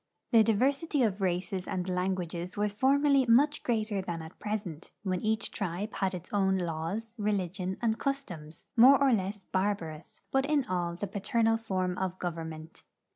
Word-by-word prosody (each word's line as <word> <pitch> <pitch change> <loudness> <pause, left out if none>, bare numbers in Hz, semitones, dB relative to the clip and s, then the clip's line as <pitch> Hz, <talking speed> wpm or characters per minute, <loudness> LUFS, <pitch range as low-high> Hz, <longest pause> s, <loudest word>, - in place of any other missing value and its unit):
The 230 -3 +7
diversity 270 +7 +2
of 205 -3 0
races 185 +1 -1
and 185 -2 -2
languages 180 0 -2
was 205 0 0
formerly 275 +3 +3
much 285 +6 +4
greater 215 -4 0
than 170 -3 -4
at 160 - -12
present, 205 -7 -4
when 185 -3 -1
each 220 +1 -1
tribe 200 +2 -3
had 190 -1 -1
its 180 0 -9
ovm 190 -2 +2
laws, 175 +7 -3
re 210 0 +1
ligion 185 -1 -2
and 225 -1 +1
customs, 180 - -4
more 260 +4 +8
or 275 -2 +4
less 200 -1 -1
barbarous, 185 -5 -3
but 270 +1 +2
in 295 -3 +2
all 175 -2 -1
the 190 - -3
pa 200 +1 -5
ternal 225 +2 +2
form 185 -4 -2
of 185 -1 -2
government. 160 -2 -6
195 Hz, 170 wpm, -30 LUFS, 180-225 Hz, -, more